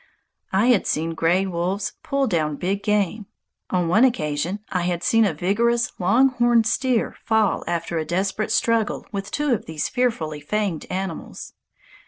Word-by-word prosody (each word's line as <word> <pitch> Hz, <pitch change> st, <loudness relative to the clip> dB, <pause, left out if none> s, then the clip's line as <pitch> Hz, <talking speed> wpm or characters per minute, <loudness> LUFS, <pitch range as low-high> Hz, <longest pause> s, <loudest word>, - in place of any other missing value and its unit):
I 200 Hz, +6 st, +3 dB
had 240 Hz, -6 st, +3 dB
seen 165 Hz, +2 st, -1 dB
gray 170 Hz, +4 st, +2 dB
wolves 190 Hz, +2 st, -2 dB
pull 275 Hz, -1 st, 0 dB
down 155 Hz, -, 0 dB
big 195 Hz, +6 st, -2 dB
game. 210 Hz, 0 st, 0 dB, 0.4 s
On 180 Hz, -2 st, 0 dB
one 215 Hz, +8 st, +4 dB
occasion 175 Hz, -, 0 dB
I 180 Hz, -, 0 dB
had 175 Hz, 0 st, -2 dB
seen 225 Hz, +2 st, +4 dB
a 195 Hz, -, 0 dB
vigorous 235 Hz, +8 st, +1 dB
long 245 Hz, +9 st, +4 dB
horned 240 Hz, -2 st, +3 dB
steer 255 Hz, +1 st, 0 dB
fall 220 Hz, -2 st, +1 dB
after 170 Hz, -1 st, -2 dB
a -, -, -1 dB
desperate 195 Hz, +6 st, -1 dB
struggle 230 Hz, -2 st, +1 dB
with 200 Hz, -1 st, -4 dB
two 295 Hz, -3 st, 0 dB
of 225 Hz, -, -3 dB
these 160 Hz, -1 st, -3 dB
fearfully 220 Hz, -, -1 dB
fanged 195 Hz, +1 st, -2 dB
animals. 190 Hz, -2 st, -5 dB
195 Hz, 160 wpm, -23 LUFS, 170-230 Hz, 0.4 s, one